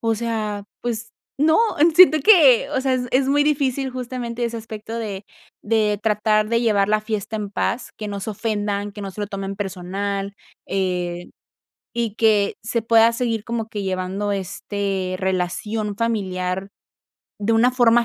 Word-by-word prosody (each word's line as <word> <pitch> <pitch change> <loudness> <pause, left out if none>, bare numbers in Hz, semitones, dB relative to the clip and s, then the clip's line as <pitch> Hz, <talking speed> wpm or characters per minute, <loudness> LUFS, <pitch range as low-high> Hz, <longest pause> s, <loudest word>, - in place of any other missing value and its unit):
o 225 -1 +1
sea, 215 -3 -3 0.2
pues, 230 -1 -4 0.3
no, 315 +2 +5 0.4
siento 350 -3 +8
que, 280 - +6
o 265 - 0
sea, 265 -1 +1
es 255 - 0
es 265 +1 +3
muy 290 +1 +3
difícil 275 -3 0
justamente 245 -1 -4
ese 235 0 -3
aspecto 225 0 -7
de 205 -3 -5 0.4
de 210 -1 +1
tratar, 215 0 +2
de 230 +1 +2
llevar 210 -4 +2
la 215 0 +2
fiesta 215 0 -3
en 205 -2 -4
paz, 235 +4 -2
que 215 - -5
no 200 -1 -4
se 200 +3 -4
ofendan, 205 -1 -2
que 205 - -10
no 195 -1 -5
se 210 - -8
lo 205 - -3
tomen 195 -1 -4
personal, 195 +1 -4 0.3
eh, 180 -2 -2 0.7
y 230 -3 -2
que 215 -3 +3
se 225 +1 -1
pueda 225 0 +5
seguir 230 -3 -1
como 230 -1 -3
que 210 -2 -4
llevando, 190 +2 -2
este, 195 -1 -3
relación 195 +3 -2
familiar 190 -4 -2 0.7
de 210 +2 0
una 230 +3 +4
forma 240 -1 +4
215 Hz, 165 wpm, -22 LUFS, 200-235 Hz, 0.7 s, siento